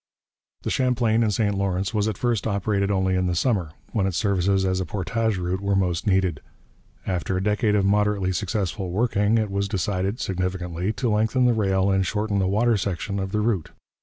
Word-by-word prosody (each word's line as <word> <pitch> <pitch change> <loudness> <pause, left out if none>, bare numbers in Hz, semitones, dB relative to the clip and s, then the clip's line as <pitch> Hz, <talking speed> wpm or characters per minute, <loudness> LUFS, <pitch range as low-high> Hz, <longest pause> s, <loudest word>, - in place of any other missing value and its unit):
The - - -2
Champlain 120 -3 +2
and 110 -2 +2
St 105 0 +1
Lawrence 95 -1 -1
was 105 -1 +1
at 110 -3 -2
first 120 -4 0
operated 100 -1 0
only 95 -2 +1
in 90 0 +1
the 90 - 0
summer, 95 - +1 0.2
when 100 -5 +1
its 95 - -2
services 95 -2 +1
as 95 0 0
a 95 - -2
portage 105 +3 -1
route 90 +1 -2
were 100 0 0
most 90 0 0
needed. 95 -6 +1 0.6
After 90 0 -1
a 95 - -1
decade 105 +1 +1
of 100 -2 +2
moderately 100 -1 +2
successful 95 0 -2
working, 105 +2 +1
it 110 -3 0
was 100 0 -1
decided, 100 +2 -1
significantly, 90 -1 -2
to 110 +3 -1
lengthen 110 +4 +2
the 120 - +4
rail 95 -3 +1
and 95 0 +2
shorten 105 +1 -1
the 95 - +1
water 110 +4 +2
section 100 +1 -3
of 95 0 -3
the 105 - 0
route. 105 -7 -1
100 Hz, 195 wpm, -24 LUFS, 95-105 Hz, 0.6 s, the